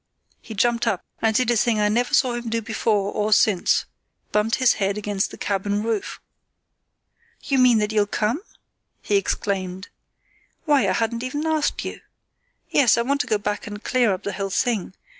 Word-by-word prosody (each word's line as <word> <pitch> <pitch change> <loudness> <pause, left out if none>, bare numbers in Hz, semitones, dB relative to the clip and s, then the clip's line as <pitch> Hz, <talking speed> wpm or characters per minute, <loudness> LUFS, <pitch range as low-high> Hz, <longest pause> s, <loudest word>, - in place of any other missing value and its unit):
He 220 - -9
jumped 235 +3 +1
up, 190 - 0 0.2
and 220 -1 +2
did 245 0 +2
a - - +2
thing 225 0 +2
I 210 - +3
never 235 +4 +1
saw 250 -2 +2
him 240 -1 -4
do 230 +1 0
before 210 -2 0
or 210 0 -1
since—bumped 210 +2 +1
his 260 -2 +4
head 195 +1 0
against 205 -2 -1
the - - -11
cabin 205 +1 -1
roof. 225 -3 -3 1.2
"You 270 -2 +1
mean 250 -2 +5
that 210 0 0
you'll 210 -2 +2
come?" 215 - -1 0.6
he 205 - 0
exclaimed. 190 -1 -2 0.8
"Why, 290 -4 +3
I - - +2
hadn't 230 0 -1
even 290 +5 -3
asked 315 -2 0
you! - - -6 0.7
Yes, 250 -6 +4
I 235 - +2
want 280 +3 +1
to - - -5
go 215 - +2
back 205 0 -4
and 205 +1 -8
clear 245 -4 +2
up 185 - -3
the 200 - -3
whole 195 -1 -3
thing. 200 -1 -1
220 Hz, 180 wpm, -23 LUFS, 205-240 Hz, 1.2 s, mean